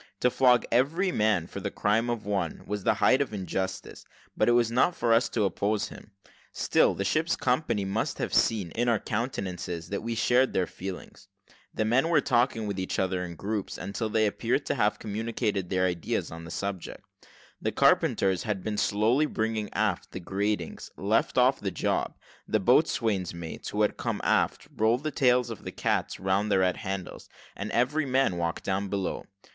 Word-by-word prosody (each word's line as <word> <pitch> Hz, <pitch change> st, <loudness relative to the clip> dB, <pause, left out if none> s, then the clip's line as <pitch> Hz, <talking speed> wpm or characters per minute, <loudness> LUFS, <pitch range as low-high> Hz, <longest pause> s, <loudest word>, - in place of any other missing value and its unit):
To 125 Hz, -, +3 dB
flog 125 Hz, -1 st, +4 dB
every 160 Hz, +11 st, +2 dB
man 105 Hz, -, +2 dB
for -, -, -7 dB
the -, -, -3 dB
crime 110 Hz, +3 st, +1 dB
of 120 Hz, -3 st, -3 dB
one, 95 Hz, -5 st, -2 dB
was 105 Hz, -1 st, -4 dB
the -, -, +3 dB
height 130 Hz, -, +4 dB
of 130 Hz, -6 st, -2 dB
injustice, 95 Hz, 0 st, -4 dB, 0.3 s
but -, -, +2 dB
it -, -, +5 dB
was 120 Hz, -1 st, +3 dB
not 130 Hz, +9 st, +3 dB
for 115 Hz, -1 st, +2 dB
us 115 Hz, +2 st, +3 dB
to 110 Hz, -, 0 dB
oppose 100 Hz, +2 st, 0 dB
him; -, -, -12 dB, 0.4 s
still -, -, +2 dB
the 100 Hz, -, -2 dB
ship's 160 Hz, -, +1 dB
company 125 Hz, -6 st, 0 dB
must 100 Hz, +3 st, -2 dB
have -, -, -3 dB
seen, 100 Hz, -7 st, +2 dB
in 120 Hz, +5 st, 0 dB
our 115 Hz, -, +3 dB
countenances, 95 Hz, -7 st, -4 dB
that 100 Hz, -, -3 dB
we 115 Hz, +1 st, -3 dB
shared 125 Hz, +3 st, +3 dB
their 95 Hz, -, +2 dB
feelings. 95 Hz, +1 st, -8 dB, 0.4 s
The 110 Hz, -, -1 dB
men 130 Hz, +9 st, +2 dB
were 165 Hz, -3 st, +5 dB
talking 120 Hz, -4 st, +1 dB
with 100 Hz, -2 st, -3 dB
each 95 Hz, -, -2 dB
other 95 Hz, -1 st, 0 dB
in 85 Hz, -1 st, -6 dB
groups, 100 Hz, +3 st, -3 dB
until 100 Hz, +4 st, -3 dB
they 110 Hz, 0 st, +2 dB
all 105 Hz, -, +3 dB
appeared -, -, -1 dB
to -, -, 0 dB
have -, -, +1 dB
communicated 105 Hz, -3 st, -2 dB
their 95 Hz, -1 st, +1 dB
ideas 90 Hz, -2 st, -2 dB
on 85 Hz, 0 st, -8 dB
the -, -, -9 dB
subject. 100 Hz, 0 st, -5 dB, 0.6 s
The -, -, -1 dB
carpenters, 95 Hz, -2 st, +3 dB
had 105 Hz, -4 st, -3 dB
been 105 Hz, -1 st, -2 dB
slowly 115 Hz, +9 st, +2 dB
bringing 110 Hz, -3 st, -2 dB
aft 105 Hz, -3 st, -1 dB
the -, -, -4 dB
gratings, 100 Hz, -1 st, -3 dB
left 110 Hz, +6 st, +1 dB
off 130 Hz, +2 st, +4 dB
the 100 Hz, -, -2 dB
job; 90 Hz, -, -1 dB, 0.3 s
the -, -, +1 dB
boatswain's 95 Hz, -7 st, +2 dB
mates, 85 Hz, -1 st, -7 dB
who -, -, +1 dB
had -, -, 0 dB
come -, -, -2 dB
aft, -, -, +1 dB
rolled 115 Hz, +5 st, +2 dB
the 155 Hz, -, -1 dB
tails 125 Hz, -3 st, +2 dB
of 115 Hz, -, -8 dB
their -, -, -5 dB
cats -, -, -1 dB
round 95 Hz, +3 st, 0 dB
the -, -, +4 dB
red 90 Hz, -1 st, +2 dB
handles; 95 Hz, -3 st, -6 dB, 0.3 s
and 100 Hz, +2 st, -5 dB
every 140 Hz, +5 st, +1 dB
man 130 Hz, -8 st, +2 dB
walked 85 Hz, -1 st, -2 dB
down 100 Hz, +1 st, -1 dB
below. 95 Hz, -1 st, -3 dB
105 Hz, 195 wpm, -28 LUFS, 95-120 Hz, 0.6 s, it